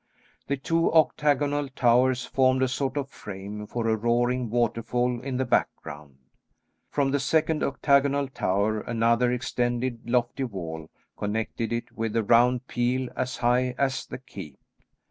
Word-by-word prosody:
The 140 - -1
two 165 +4 +1
octagonal 145 -2 +2
towers 125 0 +2
formed 130 0 +2
a - - +3
sort 135 +2 -2
of 140 -1 -3
frame 105 +1 -8
for 115 0 -2
a 110 - +3
roaring 120 +2 0
waterfall 120 +1 0
in 130 -1 -3
the 130 - 0
background. 75 - -2 0.7
From 140 -2 0
the 140 - +1
second 155 +3 +1
octagonal 140 0 +2
tower 105 -3 0
another 115 +1 +2
extended 120 -2 -2
lofty 125 +2 0
wall 80 -7 -6 0.3
connected 110 +2 -3
it 120 0 -3
with 115 -1 -3
a 115 - +2
round 120 +3 +4
peel 125 +1 -1
as 130 0 -2
high 125 +1 +1
as 135 -1 -1
the - - -6
keep. 95 - -10
125 Hz, 145 wpm, -26 LUFS, 115-135 Hz, 0.7 s, round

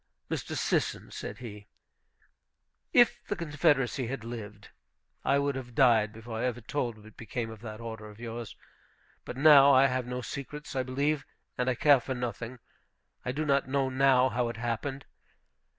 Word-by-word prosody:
"Mr. - - -3
Sisson," - - -1
said - - -6
he, 105 -4 -9 1.2
"if 240 -1 +5
the 205 - -1
Confederacy 145 -6 +1
had 130 -1 -4
lived, 110 -3 -8 0.5
I 140 - +3
would 140 0 +1
have 125 -3 -7
died 115 -5 +5
before 115 0 -7
I - - 0
ever 125 -1 -1
told 120 -2 -2
what 110 0 -15
became 115 0 -4
of 110 -1 -11
that 110 -2 -7
order 110 -2 -7
of 105 +1 -14
yours. 120 -1 -6 0.7
But 125 - -6
now 140 -1 +8
I 130 +1 +7
have 130 -2 0
no 125 0 -3
secrets, 140 +4 -7
I 130 - +2
believe, 140 +3 0 0.3
and 125 +1 0
I 125 - +1
care 145 +2 +5
for 130 +2 -4
nothing. 120 0 -4 0.7
I 125 - -2
do 150 +4 -2
not 140 -2 +2
know 135 -1 +1
now 130 -1 +4
how 120 0 0
it 115 - -6
happened. 120 +4 -3
125 Hz, 170 wpm, -29 LUFS, 115-135 Hz, 1.2 s, now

